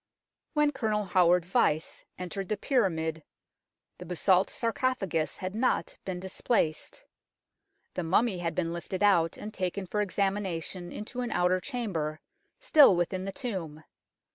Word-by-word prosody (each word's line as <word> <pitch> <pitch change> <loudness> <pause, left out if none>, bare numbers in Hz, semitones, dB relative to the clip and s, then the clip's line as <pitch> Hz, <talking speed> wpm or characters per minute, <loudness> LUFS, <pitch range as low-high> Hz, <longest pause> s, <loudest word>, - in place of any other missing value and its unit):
When 300 -1 +3
Colonel 215 -6 -1
Howard 180 -1 +4
Vyse 175 -6 +1
entered 185 +1 -5
the 215 - 0
pyra 235 -4 +2
mid 160 -1 -3 0.8
the 180 - -8
basalt 180 +2 +3
sarcophagus 225 -9 -1
had 185 0 -4
not 240 +4 0
been 185 -2 -3
displaced. 185 -3 -1 0.9
The - - -2
mummy 185 +4 +2
had 165 -2 -2
been 170 -2 -1
lifted 180 +3 -4
out, 170 -5 +4
and 210 +1 -7
taken 190 0 -2
for 210 +3 -1
examination 190 -3 -2
into 245 +4 -5
an 245 - -2
outer 180 -3 +2
chamber, 180 - -3 0.4
still 300 - +7
within 185 +2 -1
the 195 - -3
tomb. 175 - -5
185 Hz, 140 wpm, -29 LUFS, 175-215 Hz, 0.9 s, still